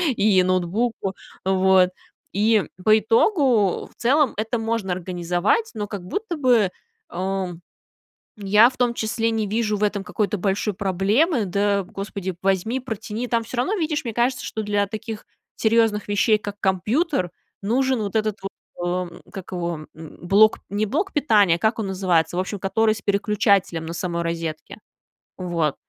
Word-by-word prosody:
и 195 -3 +4
ноутбуку. 190 +3 -1 0.3
Вот. 190 -1 +4 0.4
И, 215 +1 +3 0.2
по 215 0 +6
итогу, 230 - +2
в - - -23
целом, 280 +4 +2
это 225 +2 -1
можно 225 -4 -1
организовать, 180 - -1
но 210 -3 -4
как 200 -3 -6
будто 350 - -4
бы, 245 -8 +3 0.4
э, 190 +1 -2 0.9
я 210 +3 +5
в - - -16
том 245 -1 +2
числе 225 0 -1
не 220 -2 -1
вижу 215 0 0
в - - -5
этом 205 -1 0
какой-то 210 +2 -1
большой 200 +2 -1
проблемы: 205 - +1
"Да, 200 +1 +1
господи, 195 0 -5
возьми, 195 +6 0
протяни". 225 -1 -5
Там 230 -1 0
всё 240 - -7
равно, 255 +11 +1
видишь, 310 -5 -1
мне 230 - -3
кажется, 250 +2 0
что 220 - -4
для 205 -1 0
таких 220 +1 -7 0.3
серьёзных 225 -2 +2
вещей, 205 +2 +3
как 205 -1 -7
компьютер, 195 - 0 0.3
нужен 255 +4 +1
вот 200 -2 -4
этот 215 -1 0
вот, 195 - -4 0.3
эм, 175 0 -3
как 190 -1 -9
его, 170 -3 -3
м, 160 -1 -12
блок 210 +4 +5
не 205 +2 0
блок 335 - -1
питания, 210 - +4
как 220 +6 +1
он 220 - -2
называется, 180 -4 +1
в - - +1
общем, 195 +2 -4
который 215 +3 +1
с 205 - -10
переключателем 200 -4 +1
на 165 - -5
самой 170 0 -2
розетке. 165 -2 -4 0.6
Вот. 170 -5 -1
205 Hz, 160 wpm, -23 LUFS, 185-225 Hz, 0.9 s, по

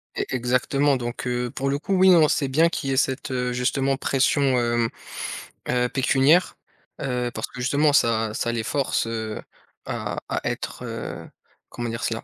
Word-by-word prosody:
É - - -1
exactement 130 +3 +2
donc 120 0 -5
heu, 125 0 -1
pour 135 +1 -2
le 140 - +1
coup, 195 - -2
oui, 190 +1 +6
non 165 -4 +7
c'est 140 - +1
bien 160 +6 +3
qu'il 135 -4 -3
y - - +1
ait - - -1
cette, 135 0 0
heu, 125 -1 -1
justement 135 +2 0
pression, 135 +2 +1 0.2
hem, 120 -1 +1 0.8
heu, 125 0 +1
pécuniaire. 135 +6 +3 0.4
Heu, 125 -2 -1
parce - - -3
que - - -11
justement 145 +4 +2
ça 115 -5 +2
ça 120 - -1
les 115 -1 -2
force, 135 -1 0
heu, 110 -1 -4 0.4
à - - -4
à - - -1
être, - - -5
heu, - - -6 0.4
comment 120 -1 -4
dire 115 0 -4
cela? 115 0 -2
130 Hz, 180 wpm, -24 LUFS, 120-140 Hz, 0.8 s, non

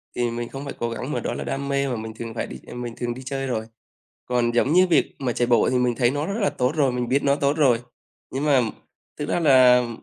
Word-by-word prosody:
thì 120 -1 0
mình 120 0 -4
không 135 +1 -7
phải 140 - -5
cố 120 - -1
gắng, 125 +5 -5
mà - - -1
đó - - -3
là - - -4
đam 140 +1 -3
mê 140 0 0
mà 125 - -2
mình 110 0 -6
thường 115 0 -7
phải 115 - -3
đi - - -8
ờ, - - -9
mình 120 -1 -5
thường 120 -1 -2
đi 130 - -9
chơi 135 0 -3
rồi. 110 -3 -2 0.6
Còn 120 -1 +1
giống 130 +6 +2
như 185 +1 +5
việc 170 - +2
mà 130 -3 -1
chạy 120 - 0
bộ 120 -2 +4
thì 130 - +1
mình 125 -1 +1
thấy 120 0 +2
nó 145 +1 -2
rất 200 +3 -2
là 200 - +3
tốt 125 +2 0
rồi, 140 -4 +2
mình 125 -1 -2
biết 140 +2 +2
nó 140 0 +3
tốt 145 +2 0
rồi. 125 -6 +4 0.5
Nhưng 135 +3 -2
mà 140 -4 +4 0.6
thực 145 - -4
ra - - +1
là 125 -5 +6
130 Hz, 280 wpm, -23 LUFS, 120-140 Hz, 0.6 s, là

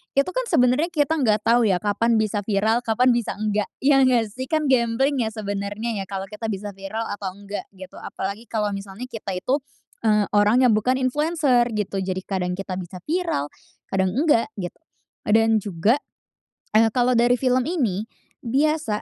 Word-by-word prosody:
itu 275 +6 +3
kan - - -2
sebenarnya 255 +6 +3
kita 320 -2 0
nggak 215 -5 +2
tau, 235 0 +4
ya, 185 -1 +1
kapan 225 +3 +2
bisa 215 -1 +1
viral, 220 +3 +2
kapan 245 +2 +2
bisa 235 -3 -1
enggak. 210 0 -1 0.2
Ya 275 0 +5
nggak 245 -5 +3
sih? 260 +4 -6
Kan 310 -3 +1
gambling 255 +3 +2
ya, 225 - +1
sebenarnya 205 +1 -3
ya, 195 - -4
kalo 195 -1 -4
kita 215 +1 -5
bisa 205 0 -4
viral 195 +3 -5
atau 195 -2 -5
enggak, 200 +1 -7
gitu. 185 0 -11
Apalagi 200 +4 -5
kalo 210 -2 -1
misalnya 195 +3 -7
kita 200 -4 -5
itu, 255 +10 0 0.4
eee, 210 -2 +3
orang 210 +5 +4
yang 250 - +5
bukan 220 +4 +2
influencer, 265 -1 +2
gitu. 200 -1 -2
Jadi 185 0 -3
kadang 180 -2 -2
kita 190 -1 -5
bisa 180 0 -9
viral, 325 - -1 0.4
kadang 190 0 0
enggak, 285 -4 +3
gitu. 180 -4 -6 0.5
Dan 225 0 +4
juga, 205 - +1 0.8
eee, 225 0 +5
kalau 250 0 +2
dari 240 +1 +3
film 255 -1 +2
ini, 245 - -1 0.4
biasa 285 -3 +1
225 Hz, 175 wpm, -23 LUFS, 200-255 Hz, 0.8 s, Ya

